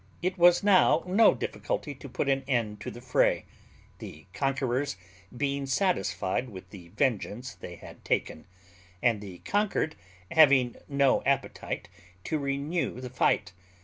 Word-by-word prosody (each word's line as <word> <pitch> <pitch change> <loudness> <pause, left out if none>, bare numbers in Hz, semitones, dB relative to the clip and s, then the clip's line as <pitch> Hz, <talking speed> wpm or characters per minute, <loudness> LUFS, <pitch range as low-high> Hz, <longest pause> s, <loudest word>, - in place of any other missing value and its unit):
It 185 +1 0
was 175 0 +5
now 190 -5 +5
no 195 +5 +5
difficulty - - -3
to - - -11
put - - -2
an 135 -1 +1
end 110 -6 -1
to - - -5
the 120 - -10
fray, 130 0 +2 0.5
the 80 +3 -10
conquerors 135 -1 -1 0.4
being 140 0 -1
satisfied 130 - 0
with 95 -3 -11
the 90 -4 -11
vengeance 125 +2 -2
they 85 - -9
had - - -13
taken, 80 - -2 0.6
and 115 -4 +2
the 95 -3 -9
conquered 205 -6 0 0.4
having 140 -6 +5
no 140 -2 +3
appetite 140 -1 -2 0.4
to 155 - -1
renew 140 +2 -2
the 125 -1 -7
fight. 105 -7 +1
135 Hz, 140 wpm, -28 LUFS, 115-155 Hz, 0.6 s, was